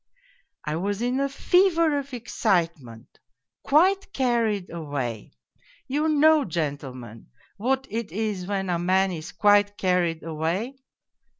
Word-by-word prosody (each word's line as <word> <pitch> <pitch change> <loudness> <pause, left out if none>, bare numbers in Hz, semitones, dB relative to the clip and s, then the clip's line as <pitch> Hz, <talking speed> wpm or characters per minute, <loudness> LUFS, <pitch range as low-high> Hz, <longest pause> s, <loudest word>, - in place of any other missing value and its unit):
I 150 +1 -2
was 200 +5 -2
in 250 +2 0
a 275 0 0
fever 335 0 +3
of 280 0 -8
excitement, 170 - -2 0.4
quite 380 +7 +3
carried 230 -7 0
away 140 -9 -4 0.6
you 300 +4 0
know, 310 0 +5
gentlemen, 140 - -5 0.3
what 265 +5 0
it 225 -6 -4
is 200 -2 -3
when 195 -2 -2
a 170 - 0
man 190 +2 +2
is 160 -1 -6
quite 205 +1 +3
carried 180 -3 0
away 165 - -3
200 Hz, 120 wpm, -25 LUFS, 165-265 Hz, 0.6 s, know